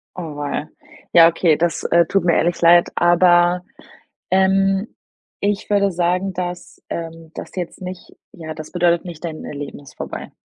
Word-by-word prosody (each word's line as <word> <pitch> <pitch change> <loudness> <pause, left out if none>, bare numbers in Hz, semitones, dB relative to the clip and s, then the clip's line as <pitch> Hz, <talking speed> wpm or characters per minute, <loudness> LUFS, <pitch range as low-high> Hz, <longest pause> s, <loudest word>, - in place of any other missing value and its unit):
Auweia. 150 -3 -5 0.4
Ja, 165 -1 +8
okay, 165 -2 +2
das, 170 0 -1
äh, 170 0 +3
tut 195 +2 0
mir 170 - +3
ehrlich 175 +1 +1
leid, 170 +1 +6
aber, 175 0 +4 0.7
ähm, 195 +2 +2 0.5
ich 205 0 -1
würde 200 -1 +2
sagen, 180 +2 0
dass, 180 -1 -6
ähm, 165 -1 -7
das - - -9
jetzt 180 0 -6
nicht 185 0 -8 0.2
ja, 160 -2 -8
das 155 -1 -10
bedeutet 175 -1 +2
nicht, 170 -3 -9
dein 160 -2 -5
Leben 145 -1 -7
ist 135 -3 -16
vorbei. - - -7
175 Hz, 155 wpm, -20 LUFS, 165-185 Hz, 0.7 s, Ja